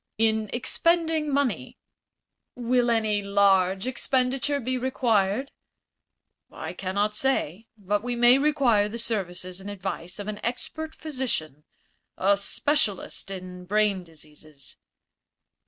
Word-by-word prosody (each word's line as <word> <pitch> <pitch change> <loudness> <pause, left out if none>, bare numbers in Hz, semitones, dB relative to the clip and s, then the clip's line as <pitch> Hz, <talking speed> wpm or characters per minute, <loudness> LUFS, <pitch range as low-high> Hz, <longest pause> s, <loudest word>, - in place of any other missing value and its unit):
"In 220 -1 +2
expending 320 +4 +1
money." 280 -3 -1 0.8
"Will 245 0 +1
any 215 -3 +1
large 195 -1 +3
expenditure 260 +2 0
be 255 0 -2
required?" 245 -2 +1 1.0
"I - - -6
cannot 200 +3 -1
say. 225 - 0
But 205 0 -1
we 245 +1 -3
may 240 +2 +6
require 265 -8 +3
the 230 - -5
services 185 -5 -4
and 200 - -7
advice 190 -2 -5
of 205 0 -6
an 210 -1 -4
expert 315 +6 -4
physician 240 - -4 0.5
a 200 +2 +4
specialist 205 0 0
in 180 -1 -8
brain 205 -1 +1
diseases." 155 -3 -15
215 Hz, 110 wpm, -26 LUFS, 190-255 Hz, 1.0 s, may